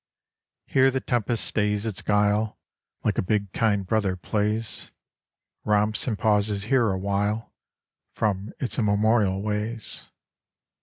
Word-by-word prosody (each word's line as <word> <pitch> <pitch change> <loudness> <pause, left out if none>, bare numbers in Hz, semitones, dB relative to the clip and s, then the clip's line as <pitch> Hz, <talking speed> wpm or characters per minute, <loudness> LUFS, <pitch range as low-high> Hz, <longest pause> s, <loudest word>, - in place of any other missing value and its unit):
Here 135 0 +4
the 130 0 -1
tempest 120 -2 0
stays 105 0 0
its 110 -4 -3
guile, 105 +1 +1 0.5
Like - - +1
a - - +4
big 100 0 -1
kind 105 -4 +1
brother 100 -2 +1
plays, 105 +4 -2 0.7
Romps 105 +2 +2
and 110 -4 0
pauses 105 -1 +1
here 120 0 +2
awhile 100 +3 -1 0.6
From 105 -1 -1
its 130 - -2
immemorial 105 -2 +2
ways. 110 +2 -2
105 Hz, 115 wpm, -25 LUFS, 100-110 Hz, 0.7 s, Here